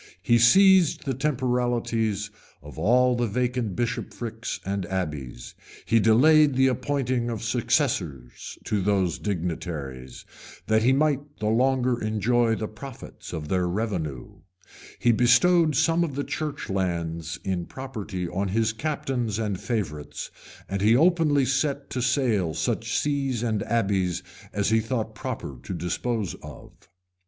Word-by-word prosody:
He 120 0 +4
seized 190 - +5
the 135 - 0
temporalities 120 -6 -1 0.3
of 75 +2 -10
all 125 +7 +4
the 120 0 0
vacant 120 -2 -1
bishoprics 115 -1 -4
and 95 -2 -2
abbeys; 75 -10 -4 0.3
he 115 - +3
delayed 145 +7 +5
the 130 +1 +4
appointing 130 -2 -1
of 115 -2 -4
successors 110 - -1
to 105 -2 -1
those 95 -7 +1
dignities, 80 -8 -4 0.4
that 110 0 +3
he 125 +4 +4
might 140 0 +2 0.2
the 105 - -1
longer 125 +1 +2
enjoy 110 +2 +1
the 110 - -3
profits 125 +4 -10
of 75 -1 -5
their 90 +1 0
revenue; 85 - -3 0.6
he 120 - +3
bestowed 155 +7 +4
some 165 +6 +3
of 150 -6 -3
the 140 - -1
church 150 -1 -4
lands 85 -4 -2
in 90 -3 -2
property 105 -9 -5
on 95 +3 -2
his 110 +3 +1
captains 125 -5 -2
and 105 -4 -2
favorites; 85 - -4 0.4
and 100 0 -3
he 110 +3 +5
openly 155 -2 +3
set 140 +2 -1
to 125 - -2
sale 120 - +1
such - - -1
sees 135 -5 -1
and 110 -4 0
abbeys 95 -6 0 0.3
as 100 +1 0
he 110 - +4
thought 110 -1 -3
proper 70 - -6
to 90 +7 -5
dispose 95 +4 -2
of. - - -11
115 Hz, 135 wpm, -25 LUFS, 95-130 Hz, 0.6 s, seized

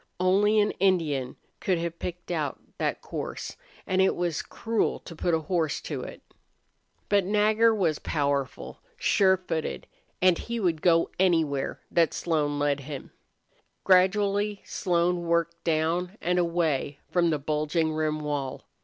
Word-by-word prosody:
Only 200 +4 +4
an 210 0 +3
Indian 155 -9 +1 0.2
could 185 -2 +1
have 170 0 -4
picked 180 0 -6
out 155 -5 -2 0.2
that - - -1
course, - - -5 0.3
and 185 0 +1
it 190 - +3
was 175 -4 -1
cruel 225 -1 -1
to 165 - -10
put 170 +1 +1
a 160 - -1
horse 165 -3 -1
to - - -4
it. - - -9 0.8
But 205 -1 +3
Nagger 215 +3 +3
was 170 -7 +1
powerful, 140 -3 -2 0.2
sure 190 - +3
footed, 165 -4 -4 0.3
and 180 -2 +4
he 235 0 -4
would 170 -6 0
go 165 -1 +3
anywhere 160 -7 +1
that 165 -2 +2
Slone 150 -4 0
led 145 -1 +1
him. 140 0 -8 0.7
Gradually 200 +2 +3
Slone 175 -1 0
worked 170 0 0
down 170 +4 0
and 180 +1 +1
away 165 -5 0
from 175 -1 +3
the 155 - +1
bulging 155 +2 0
rim 155 -1 -1
wall. 145 -3 -3
170 Hz, 145 wpm, -27 LUFS, 155-190 Hz, 0.8 s, Only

